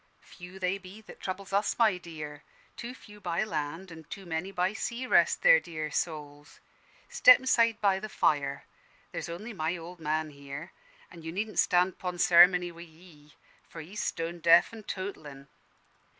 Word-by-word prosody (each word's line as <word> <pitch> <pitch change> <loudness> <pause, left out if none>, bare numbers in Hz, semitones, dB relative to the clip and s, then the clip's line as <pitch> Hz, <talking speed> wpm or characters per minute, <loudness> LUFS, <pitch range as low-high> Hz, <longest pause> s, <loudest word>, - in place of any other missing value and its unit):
"Few 180 +1 -12
they 190 +1 -1
be 195 +3 -12
that - - -14
troubles 195 +1 -6
us, 200 +1 +1
my 215 -6 +3
dear. 155 -4 -8 0.3
Too 245 +2 -7
few 210 -4 -15
by 175 +1 -1
land, 165 -1 -4
an' 160 -1 -11
too 195 +6 -9
many 170 +3 -3
by 185 +1 0
sea, 235 +3 -4
rest 255 - +3
their - - +8
dear 155 -2 -6
souls! 145 -2 -5 0.5
Step 485 - +7
inside 230 -3 +2
by 195 -2 +3
the 215 +2 -7
fire. 140 -7 0 0.5
There's - - -5
only 210 +8 -7
my 165 -1 -2
old 170 +1 -10
man 155 0 -2
here, 140 -1 -9 0.4
an' 170 - -12
you 160 0 -6
needn't 210 +4 -3
stand 180 0 +2
'pon 180 -1 -4
ceremony 175 0 +6
wi' 170 0 -12
he: 160 -3 -17 0.3
for 165 - -10
he's 190 +8 -6
stone 170 +1 -3
deaf 170 +5 +5
an' 220 -2 -10
totelin'. 150 -9 -7
175 Hz, 170 wpm, -29 LUFS, 160-200 Hz, 0.5 s, their